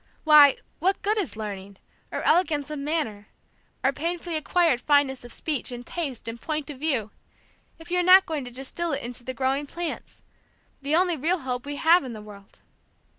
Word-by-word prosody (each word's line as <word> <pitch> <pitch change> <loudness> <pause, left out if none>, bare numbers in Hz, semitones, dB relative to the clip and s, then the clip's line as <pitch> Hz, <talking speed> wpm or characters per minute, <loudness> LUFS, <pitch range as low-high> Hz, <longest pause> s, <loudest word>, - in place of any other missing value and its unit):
Why, 300 -3 +8 0.2
what 380 +4 0
good 425 +2 +1
is 325 - -3
learning, 200 -2 -7 0.3
or - - -3
elegance 305 -4 +2
of 300 - -4
manner, 280 -9 -3 0.6
or 265 +1 +3
painfully 340 +2 -3
acquired 310 -4 +2
fineness 285 -3 +2
of 240 - -10
speech, 290 -2 -3
and 245 0 -7
taste 280 -10 -4
and 230 0 -6
point 305 -1 -3
of 270 - -11
view, 260 -9 -1 0.7
if 330 +1 -13
you 360 - +2
are - - +3
not 370 +2 +7
going 310 -4 -3
to - - -7
distil 275 +6 -2
it 280 - -3
into 245 0 -3
the 260 +1 -6
growing 275 +2 -1
plants, 340 +2 -6 0.6
the 285 +3 0
only 350 -1 +2
real 330 +5 0
hope 255 +1 -4
we 290 - -4
have 330 +4 +4
in 255 -3 -6
the 215 - -8
world! 200 -2 -15
290 Hz, 190 wpm, -25 LUFS, 250-330 Hz, 0.7 s, Why